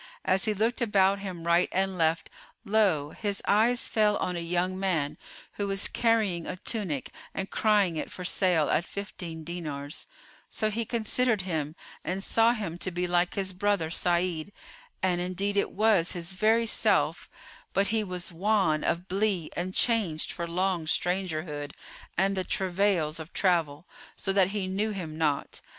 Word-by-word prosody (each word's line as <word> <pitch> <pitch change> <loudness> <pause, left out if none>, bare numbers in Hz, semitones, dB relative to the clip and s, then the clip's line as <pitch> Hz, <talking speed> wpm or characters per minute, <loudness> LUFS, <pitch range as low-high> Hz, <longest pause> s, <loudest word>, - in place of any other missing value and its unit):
As 190 +1 +3
he 215 - +1
looked 225 +5 0
about 200 -3 +3
him 185 -4 -6
right 170 +1 +3
and 190 0 0
left, 160 -1 +1 0.3
lo! 190 -9 +2
his 200 0 -2
eyes 230 +4 +3
fell 210 -2 +3
on 180 - -2
a - - -2
young 180 +2 -1
man, 160 -7 0 0.4
who 205 - -1
was 195 0 0
carrying 220 -7 +1
a - - -3
tunic 185 - -3 0.2
and 195 0 -3
crying 205 -6 +2
it - - -3
for 180 - -7
sale 175 -5 +3
at 170 - +2
fifteen 175 -5 -7
dinars: 150 -4 -5 0.4
so 215 0 -1
he 230 +2 -1
considered 230 -1 +1
him 160 -4 -3 0.3
and 190 +2 -3
saw 230 +2 +4
him 195 -7 -4
to 185 - -2
be 180 0 -2
like 175 0 +1
his 190 -1 -1
brother 190 -4 0
Sa'id; 175 0 0 0.5
and 180 -2 +2
indeed 190 +3 -1
it 200 - +2
was 205 -4 +3
his 175 +1 -2
very 220 +4 +3
self, 225 - +1 0.4
but 200 0 +1
he 220 0 +1
was 180 -2 -3
wan 185 -3 +1
of 175 +2 -1
blee 195 -4 0
and 180 +2 -2
changed 195 -8 +1
for 170 - -4
long 180 -1 0
strangerhood 155 -5 -1 0.4
and 195 +2 +2
the 190 - -1
travails 180 -5 +1
of 160 +2 -9
travel, 165 -4 +1 0.3
so 195 - -1
that 190 -2 +4
he 200 -1 -2
knew 195 +4 -1
him 175 -7 -5
not. 150 -3 -1
185 Hz, 165 wpm, -28 LUFS, 170-205 Hz, 0.5 s, saw